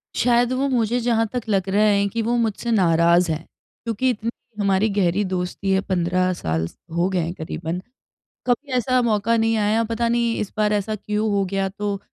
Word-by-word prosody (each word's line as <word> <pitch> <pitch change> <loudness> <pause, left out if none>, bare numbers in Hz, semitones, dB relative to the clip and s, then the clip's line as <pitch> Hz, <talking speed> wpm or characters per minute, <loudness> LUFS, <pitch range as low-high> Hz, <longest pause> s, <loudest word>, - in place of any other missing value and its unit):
शायद 240 0 +3
वो 265 +2 0
मुझे 240 -1 +1
जहाँ 230 -1 +1
तक 250 - -1
लग 195 -2 +1
रहा 205 +2 +3
हैं 200 -1 +3
कि 230 +3 -2
वो 235 +2 0
मुझसे 230 0 -1
नाराज़ 170 -3 +4
हैं 160 +1 -3 0.4
क्योंकि 230 +2 0
इतनी 230 -1 -2 0.3
हमारी 200 +1 +2
गहरी 200 -1 +1
दोस्ती 185 +1 -2
है, 190 0 +3
15 185 -1 0
साल 80 - -2 0.3
हो 170 +1 +2
गए 185 -2 0
हैं 170 0 -2
क़रीबन। 165 +1 -5 0.7
कभी 265 +3 0
ऐसा 255 +1 +2
मौक़ा 225 -1 +1
नहीं 225 0 +2
आया 215 +2 +2
पता 230 +1 -1
नहीं 235 -1 +1
इस 210 - -3
बार 210 0 +2
ऐसा 210 +1 -1
क्यों 210 +1 -2
हो 200 -1 +2
गया 195 0 0
तो 200 0 -3
210 Hz, 195 wpm, -22 LUFS, 185-230 Hz, 0.7 s, नाराज़